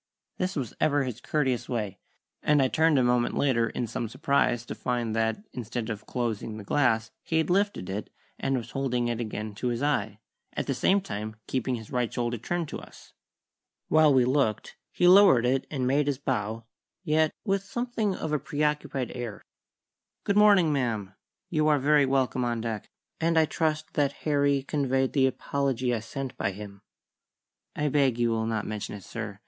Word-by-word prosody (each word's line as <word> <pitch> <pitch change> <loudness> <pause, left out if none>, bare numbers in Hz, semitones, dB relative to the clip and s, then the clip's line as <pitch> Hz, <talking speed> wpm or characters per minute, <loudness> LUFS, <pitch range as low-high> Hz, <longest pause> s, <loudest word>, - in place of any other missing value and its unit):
This 185 +1 -1
was 130 -8 -3
ever 145 -2 +3
his 125 -2 -5
courteous 130 -5 -1
way, 105 -6 -3 0.4
and 150 -1 +3
I 130 -1 +3
turned 160 0 +3
a 130 - +4
moment 120 0 +2
later 115 -5 +2
in 120 - -3
some 115 0 -4
surprise, 140 -4 +1
to - - -5
find 120 -3 -2
that, 115 - 0
instead 120 -1 -4
of 105 0 -7
closing 115 -3 -3
the 105 - -8
glass, 110 -2 +1
he 160 - -1
had 160 +1 +1
lifted 200 - +1
it, 100 +2 -4 0.3
and 135 -1 0
was 120 0 -6
holding 125 -3 -1
it 120 0 -2
again 105 -1 -4
to 115 +5 -3
his 120 +2 -1
eye, 110 -8 0 0.4
at - - -2
the - - 0
same 200 +1 +3
time 110 - -5
keeping 130 0 -1
his 110 -2 -9
right 125 -2 0
shoulder 120 -1 -2
turned 175 +7 -2
to - - -5
us. - - -15 0.8
While 155 -1 +6
we 130 -2 +5
looked, 130 -5 0 0.2
he 180 - +2
lowered 180 -10 +7
it 130 +2 +1
and 135 -4 -2
made 140 +3 +2
his 140 -2 0
bow, 115 -4 -2 0.4
yet 155 -2 +3 0.2
with 195 -2 +1
something 225 -2 -2
of 155 -1 -3
a 150 - +2
preoccupied 150 -2 -1
air. 120 -4 -6 0.8
"Good 200 - 0
morning, 200 -7 +6
ma'am. 110 -8 -1 0.4
You 155 -2 +2
are 150 -1 +5
very 145 0 +4
welcome 130 -1 +1
on 120 -1 -1
deck, 110 -2 -4 0.3
and 165 0 +1
I 160 - +6
trust 155 0 -1
that 140 -1 +1
Harry 140 -2 +2
conveyed 135 -2 0
the 135 -2 +4
apology 130 -2 -1
I 115 - 0
sent 135 +4 -6
by 100 - -1
him." 100 0 -10 0.9
"I 150 - 0
beg 135 -4 +2
you 120 -1 +2
will 110 0 0
not 110 -2 -1
mention 105 -1 -4
it, 100 - -10
sir. 105 -2 -6
130 Hz, 185 wpm, -27 LUFS, 115-150 Hz, 0.9 s, lowered